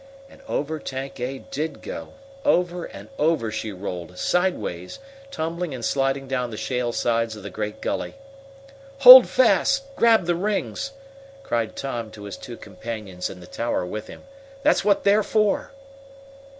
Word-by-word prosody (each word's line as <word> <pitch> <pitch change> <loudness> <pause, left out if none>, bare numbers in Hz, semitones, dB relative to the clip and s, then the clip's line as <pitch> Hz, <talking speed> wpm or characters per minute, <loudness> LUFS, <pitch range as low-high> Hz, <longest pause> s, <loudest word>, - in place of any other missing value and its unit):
And 275 - -18
over 155 - -2
Tank 135 -1 -6
A 130 +2 -3
did 155 +4 -5
go. - - -7 0.3
Over 180 - +1
and 100 +2 -11
over 150 -8 +1
she 110 0 -4
rolled, 90 -2 -7
sidewise, 175 - -1 0.3
tumbling 170 - -3
and 120 -3 -5
sliding 135 0 0
down 125 -2 -1
the 110 - -7
shale 125 0 -1
sides 115 -1 0
of 105 - -11
the 100 - -7
great 105 +1 -5
gully. - - -3 0.9
"Hold 255 -1 +12
fast! 275 +1 +3
Grab 225 -5 +4
the 175 - +2
rings!" 210 +8 -2 0.5
cried 115 - -2
Tom 120 -5 -4
to 105 - -10
his 100 -2 -6
two 120 -2 -9
companions 100 -2 -6
in 90 - -10
the - - -11
tower 115 0 -2
with 110 +4 -6
him. - - -12 0.4
"That's 300 -6 +3
what 200 -1 +2
they're 205 +2 +4
for!" 215 -1 +1
130 Hz, 155 wpm, -24 LUFS, 110-180 Hz, 0.9 s, Hold